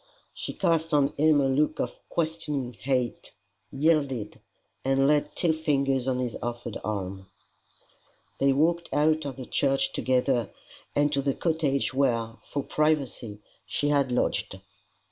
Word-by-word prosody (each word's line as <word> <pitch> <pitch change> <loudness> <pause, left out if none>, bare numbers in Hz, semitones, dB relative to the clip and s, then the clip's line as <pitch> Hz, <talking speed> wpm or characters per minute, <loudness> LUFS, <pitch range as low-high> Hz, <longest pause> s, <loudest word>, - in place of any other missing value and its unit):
She - - -5
cast 165 -1 +1
on 140 -1 +4
him 155 0 +4
a - - +2
look 140 +3 +1
of - - -3
questioning 155 -6 -2
hate, 125 0 -2 0.4
yielded, 140 -7 0 0.4
and 135 +1 +2
laid 150 +1 +2
two 170 -3 +2
fingers 140 -5 0
on 130 -1 +1
his 125 -2 -2
offered 120 -1 -4
arm. 95 -2 -4 1.1
They 140 0 +4
walked 165 +5 +1
out 155 +1 +2
of 140 -2 -4
the 130 -1 -7
church 135 +1 +1
together 130 -1 +1 0.5
and 145 +1 +2
to 140 - +2
the 140 -1 0
cottage 155 -6 0
where, 115 -4 0
for 140 - -4
privacy, 135 -9 -1 0.2
she 145 - 0
had 140 -3 +2
lodged. 125 - 0
140 Hz, 140 wpm, -27 LUFS, 125-150 Hz, 1.1 s, on